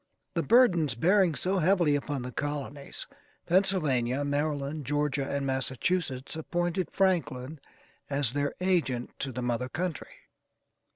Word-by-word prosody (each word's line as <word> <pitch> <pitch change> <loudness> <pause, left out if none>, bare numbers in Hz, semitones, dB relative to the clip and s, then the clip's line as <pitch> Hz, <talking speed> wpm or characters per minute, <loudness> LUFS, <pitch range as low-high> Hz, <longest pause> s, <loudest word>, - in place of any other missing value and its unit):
The - - +1
burdens 175 - +4
bearing 180 - +3
so 190 +4 0
heavily 170 -3 +3
upon 145 -2 -2
the 125 - -5
colonies: 145 +1 -4 0.4
Pennsylvania, 145 -9 +2
Maryland, 145 0 -1
Georgia, 145 0 -1
and 140 -1 -1
Massachusetts, 135 +2 -1
appointed 175 +2 -1
Franklin 155 -7 0 0.5
as 140 -4 +1
their 145 0 -1
agent 170 -10 0
to 135 - -2
the 125 0 -4
mother 125 +1 -1
country. 170 0 -4
145 Hz, 120 wpm, -29 LUFS, 135-175 Hz, 0.5 s, burdens